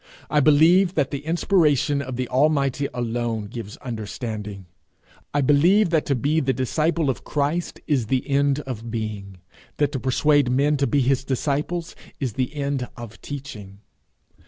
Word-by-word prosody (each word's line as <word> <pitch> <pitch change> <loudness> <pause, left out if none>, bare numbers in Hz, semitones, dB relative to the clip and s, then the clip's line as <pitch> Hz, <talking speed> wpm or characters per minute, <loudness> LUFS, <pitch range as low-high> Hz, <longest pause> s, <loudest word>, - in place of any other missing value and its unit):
I 150 - +4
believe 165 +6 +5
that 140 -3 +1
the 140 - -2
inspiration 155 -5 +2
of 130 -2 -5
the 125 0 -2
Almighty 140 0 +2
alone 120 -2 -2
gives 105 -1 -8
understanding. 110 -4 -6 0.7
I 145 - +1
believe 170 +8 +4
that 160 -3 +1
to 140 - +2
be 145 +6 +1
the 135 -3 +1
disciple 155 +5 0
of - - -8
Christ 150 +4 -2
is 130 -7 0
the 130 +2 0
end 140 0 +2
of 115 -4 -6
being; 105 -4 -5 0.4
that 145 -1 +1
to 135 - -3
persuade 140 +2 +2
men 140 +4 +2
to 140 0 +1
be 145 - +2
his 130 +1 +1
disciples 150 +5 -2 0.2
is 130 -6 -2
the 130 +5 -2
end 140 -3 -2
of 115 -2 -10
teaching. 110 -9 -8
140 Hz, 160 wpm, -23 LUFS, 120-150 Hz, 0.7 s, believe